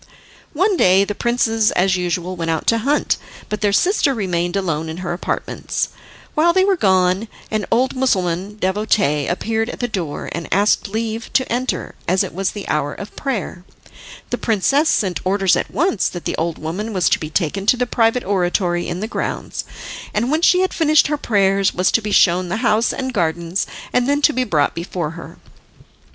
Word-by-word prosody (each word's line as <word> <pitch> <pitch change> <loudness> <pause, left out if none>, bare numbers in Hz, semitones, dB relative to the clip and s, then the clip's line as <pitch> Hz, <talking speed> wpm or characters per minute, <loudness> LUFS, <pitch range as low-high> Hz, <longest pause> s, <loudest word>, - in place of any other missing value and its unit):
One 375 +5 +2
day 185 - +5
the 205 - -3
princes 225 -1 +1
as 185 +1 +2
usual 180 0 -2
went 165 -2 -3
out 160 -1 -1
to 230 - +3
hunt, 280 +6 +1 0.3
but 210 - -3
their 205 -1 +2
sister 290 - +2
remained 175 -4 -1
alone 165 -5 -1
in 160 - -6
her 175 - -1
apartments. 175 - -3 0.4
While 335 +3 +3
they 375 +1 +4
were 395 -1 +3
gone 190 - +2 0.2
an 215 -2 -1
old 255 +4 +2
Mussulman 195 -6 0
devotee 190 -7 +1
appeared 225 +5 -1
at - - -7
the 245 - -1
door, 180 -10 -4
and 170 -1 -6
asked 205 +4 +2
leave 225 +2 -4
to 260 - +2
enter, 255 +2 -2
as 185 +2 +3
it - - -6
was 190 +2 -1
the 205 - -7
hour 145 -1 -1
of 200 - -9
prayer. 220 -9 -4 0.7
The - - -1
princess 275 - +2
sent 185 -4 +1
orders 195 0 +2
at - - -2
once 310 - +1
that 175 - -8
the - - -1
old 165 0 -2
woman 195 +8 -4
was 180 -4 +2
to - - +2
be 155 - -5
taken 190 +4 -1
to 250 - +5
the 250 - +1
private 235 0 +1
oratory 180 -2 0
in 180 - -4
the 215 - -2
grounds, - - -4 0.5
and 235 +5 +1
when 310 +2 +1
she 360 +1 +5
had 375 - 0
finished 310 -3 +3
her 300 - 0
prayers 195 -5 +2
was 185 0 +2
to 230 - +2
be 210 -1 -4
shown 180 -2 +3
the 185 - -1
house 225 +1 +3
and 260 -1 -4
gardens, 170 -1 -1 0.3
and 250 +1 +2
then 290 +1 +1
to 300 - +5
be 255 -1 0
brought 150 -9 +1
before 170 -2 -4
her. 165 0 -10
200 Hz, 195 wpm, -19 LUFS, 175-240 Hz, 0.7 s, day